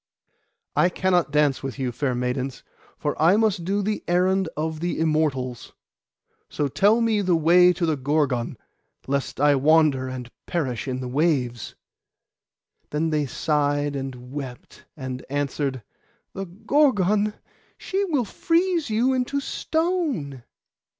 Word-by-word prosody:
'I 175 Hz, -, +4 dB
cannot 180 Hz, -2 st, +1 dB
dance 150 Hz, -2 st, +2 dB
with 135 Hz, -1 st, -5 dB
you, 130 Hz, -2 st, -2 dB
fair 130 Hz, 0 st, -1 dB
maidens; 125 Hz, +1 st, -3 dB, 0.3 s
for 145 Hz, -1 st, -2 dB
I 175 Hz, +6 st, +5 dB
must 215 Hz, -6 st, +1 dB
do 200 Hz, +3 st, 0 dB
the 210 Hz, +1 st, -2 dB
errand 185 Hz, +1 st, +2 dB
of 160 Hz, 0 st, -2 dB
the 175 Hz, 0 st, -2 dB
Immortals. 150 Hz, -6 st, -1 dB, 0.8 s
So 145 Hz, -, -1 dB
tell 205 Hz, -, +3 dB
me 225 Hz, -2 st, +2 dB
the 185 Hz, -3 st, +2 dB
way 175 Hz, +3 st, +6 dB
to 175 Hz, 0 st, -1 dB
the 160 Hz, -2 st, 0 dB
Gorgon, 135 Hz, -3 st, 0 dB, 0.5 s
lest 140 Hz, -1 st, -2 dB
I 145 Hz, +1 st, +5 dB
wander 145 Hz, -2 st, +3 dB
and 125 Hz, -2 st, -7 dB, 0.2 s
perish 135 Hz, -8 st, -2 dB
in 130 Hz, 0 st, -3 dB
the 125 Hz, -, -4 dB
waves.' 125 Hz, -4 st, 0 dB, 1.1 s
Then 160 Hz, +2 st, -1 dB
they 150 Hz, -2 st, 0 dB
sighed 145 Hz, 0 st, 0 dB
and 130 Hz, -2 st, -6 dB
wept; 135 Hz, -4 st, -8 dB
and 130 Hz, -2 st, -5 dB
answered—'The 140 Hz, -, -5 dB, 0.2 s
Gorgon! 210 Hz, -7 st, +3 dB, 0.4 s
she 390 Hz, +1 st, -2 dB
will 290 Hz, -, 0 dB
freeze 335 Hz, -, 0 dB
you 235 Hz, +5 st, +2 dB
into 260 Hz, +2 st, 0 dB
stone. 305 Hz, -, -2 dB
155 Hz, 130 wpm, -24 LUFS, 135-195 Hz, 1.1 s, way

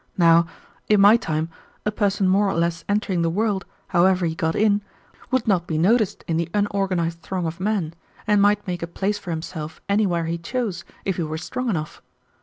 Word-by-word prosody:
Now, 170 Hz, -1 st, +5 dB, 0.4 s
in 210 Hz, -1 st, +5 dB
my 205 Hz, +3 st, +8 dB
time 160 Hz, -8 st, -1 dB, 0.4 s
a 210 Hz, -, +1 dB
person 200 Hz, -2 st, +1 dB
more 195 Hz, +2 st, +3 dB
or 195 Hz, -, -1 dB
less 170 Hz, 0 st, 0 dB
entering 205 Hz, -4 st, +1 dB
the 165 Hz, -, +2 dB
world, 205 Hz, +2 st, 0 dB, 0.2 s
however 180 Hz, 0 st, +3 dB
he 160 Hz, -, 0 dB
got 160 Hz, 0 st, -1 dB
in, 205 Hz, -1 st, +3 dB, 0.5 s
would 260 Hz, -2 st, 0 dB
not 180 Hz, -4 st, +2 dB
be 160 Hz, -, -1 dB
noticed 210 Hz, +5 st, +2 dB
in 165 Hz, -, 0 dB
the 170 Hz, 0 st, -1 dB
unorganized 190 Hz, -5 st, 0 dB
throng 180 Hz, +2 st, -3 dB
of 165 Hz, +2 st, -4 dB
men, 190 Hz, -5 st, -1 dB, 0.3 s
and 205 Hz, -1 st, +3 dB
might 205 Hz, 0 st, +3 dB
make 175 Hz, -2 st, -3 dB
a 170 Hz, -, -3 dB
place 200 Hz, +4 st, -2 dB
for 185 Hz, -, -9 dB
himself 160 Hz, -1 st, -5 dB
anywhere 200 Hz, -5 st, +1 dB
he 170 Hz, +1 st, -2 dB
chose 200 Hz, 0 st, -3 dB, 0.2 s
if 190 Hz, -3 st, -1 dB
he -, -, -1 dB
were 155 Hz, -1 st, -3 dB
strong 250 Hz, +9 st, -3 dB
enough. 155 Hz, -7 st, -3 dB
185 Hz, 200 wpm, -23 LUFS, 165-205 Hz, 0.5 s, my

